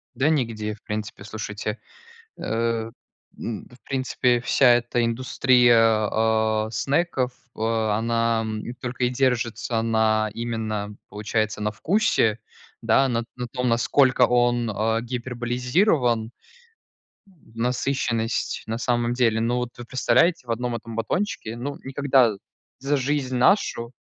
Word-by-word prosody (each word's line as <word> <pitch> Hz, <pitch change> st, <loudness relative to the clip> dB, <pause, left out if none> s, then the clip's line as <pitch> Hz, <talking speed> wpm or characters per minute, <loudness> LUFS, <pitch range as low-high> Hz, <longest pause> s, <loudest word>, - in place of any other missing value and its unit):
Да 135 Hz, +5 st, +2 dB
нигде, 115 Hz, -8 st, -1 dB
в 105 Hz, -, -16 dB
принципе, 105 Hz, -1 st, -5 dB
слушайте. 105 Hz, +1 st, -5 dB, 0.6 s
Э, 115 Hz, 0 st, -1 dB, 0.5 s
м, 110 Hz, -4 st, -5 dB
в 125 Hz, -, -17 dB
принципе, 130 Hz, -2 st, +1 dB
вся 130 Hz, +2 st, +2 dB
эта 120 Hz, 0 st, 0 dB
индустрия, 115 Hz, -2 st, +3 dB
а, 110 Hz, -1 st, +1 dB
снеков, 135 Hz, -1 st, 0 dB, 0.2 s
о 110 Hz, 0 st, 0 dB
она, 115 Hz, 0 st, +1 dB
м, 110 Hz, -1 st, -4 dB, 0.2 s
только 125 Hz, 0 st, -3 dB
и 125 Hz, -, +2 dB
держится, 120 Hz, -3 st, 0 dB
на 110 Hz, -1 st, +2 dB
именно, 110 Hz, -3 st, -3 dB
получается, 110 Hz, 0 st, -2 dB
на 105 Hz, -, 0 dB
вкусе, 135 Hz, -, +1 dB, 0.4 s
да, 135 Hz, -, +3 dB
на 115 Hz, -1 st, 0 dB
т -, -, -19 dB
на 125 Hz, -1 st, -5 dB
том, 125 Hz, +2 st, -2 dB
насколько 125 Hz, +3 st, +3 dB
он, 120 Hz, -1 st, +2 dB
а, 110 Hz, +2 st, 0 dB
гиперболизирован, 125 Hz, -, 0 dB, 1.0 s
н 175 Hz, -, -23 dB
насыщенность, 120 Hz, -1 st, -1 dB
на 110 Hz, +1 st, -2 dB
самом 120 Hz, -1 st, 0 dB
деле. 115 Hz, -3 st, +2 dB
Ну, 120 Hz, +2 st, 0 dB
вот, 125 Hz, -1 st, -2 dB
вы 120 Hz, -, -8 dB
представляете, 125 Hz, +3 st, +2 dB
в -, -, -2 dB
1 120 Hz, +1 st, -2 dB
этом 115 Hz, 0 st, -7 dB
батончике, 115 Hz, -, -2 dB
ну, 140 Hz, +4 st, -5 dB
никогда 135 Hz, -5 st, +2 dB, 0.4 s
за 140 Hz, +2 st, 0 dB
жизнь 135 Hz, -1 st, -1 dB
нашу 125 Hz, -, +2 dB
120 Hz, 130 wpm, -24 LUFS, 110-125 Hz, 1.0 s, индустрия